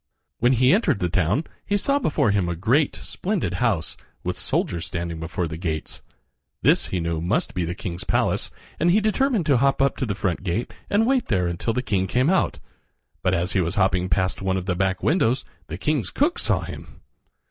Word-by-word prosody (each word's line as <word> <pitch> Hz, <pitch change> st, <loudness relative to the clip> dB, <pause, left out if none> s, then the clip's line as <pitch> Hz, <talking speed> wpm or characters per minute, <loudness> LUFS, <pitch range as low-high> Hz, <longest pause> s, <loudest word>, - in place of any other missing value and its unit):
When 120 Hz, +3 st, +4 dB
he 130 Hz, +2 st, +4 dB
entered 210 Hz, -, +2 dB
the 90 Hz, -, 0 dB
town 90 Hz, -, +1 dB, 0.2 s
he 205 Hz, -, 0 dB
saw 280 Hz, +7 st, +1 dB
before 150 Hz, -, +1 dB
him 100 Hz, -4 st, +1 dB
a 85 Hz, -, -2 dB
great, 120 Hz, -, +2 dB
splendid 180 Hz, -, -3 dB
house, 100 Hz, -9 st, 0 dB, 0.3 s
with -, -, -2 dB
soldiers 85 Hz, -1 st, -1 dB
standing 85 Hz, -1 st, -4 dB
before 85 Hz, +1 st, -2 dB
the 80 Hz, 0 st, -6 dB
gates. 80 Hz, -3 st, -4 dB, 0.6 s
This -, -, +4 dB
he 95 Hz, -, -2 dB
knew 85 Hz, -1 st, -2 dB
must 90 Hz, +6 st, 0 dB
be 90 Hz, -2 st, -1 dB
the 85 Hz, +2 st, -4 dB
king's 90 Hz, -3 st, -5 dB
palace, -, -, 0 dB, 0.3 s
and 170 Hz, -, +3 dB
he 190 Hz, +5 st, +5 dB
determined 220 Hz, -, +1 dB
to 140 Hz, -4 st, +4 dB
hop 135 Hz, +2 st, +2 dB
up 140 Hz, 0 st, +2 dB
to 130 Hz, -, -1 dB
the 100 Hz, -, -1 dB
front 95 Hz, -4 st, -1 dB
gate 100 Hz, +5 st, -2 dB, 0.2 s
and 210 Hz, +2 st, +3 dB
wait 260 Hz, 0 st, +2 dB
there 95 Hz, -5 st, +1 dB
until 85 Hz, +6 st, -1 dB
the 125 Hz, -, -1 dB
king 100 Hz, -7 st, 0 dB
came 130 Hz, -, +2 dB
out. 190 Hz, -, +1 dB, 0.6 s
But 95 Hz, 0 st, +2 dB
as 90 Hz, +1 st, -1 dB
he 95 Hz, -, +2 dB
was 85 Hz, +1 st, -2 dB
hopping 95 Hz, -2 st, +2 dB
past 95 Hz, +3 st, 0 dB
one 95 Hz, -1 st, 0 dB
of 90 Hz, -, -4 dB
the 95 Hz, -, 0 dB
back 95 Hz, 0 st, -1 dB
windows 140 Hz, -6 st, +2 dB, 0.2 s
the 80 Hz, +3 st, -5 dB
king's 130 Hz, -2 st, 0 dB
cook 305 Hz, +5 st, +1 dB
saw -, -, +1 dB
him. -, -, -9 dB
100 Hz, 210 wpm, -24 LUFS, 90-140 Hz, 0.6 s, he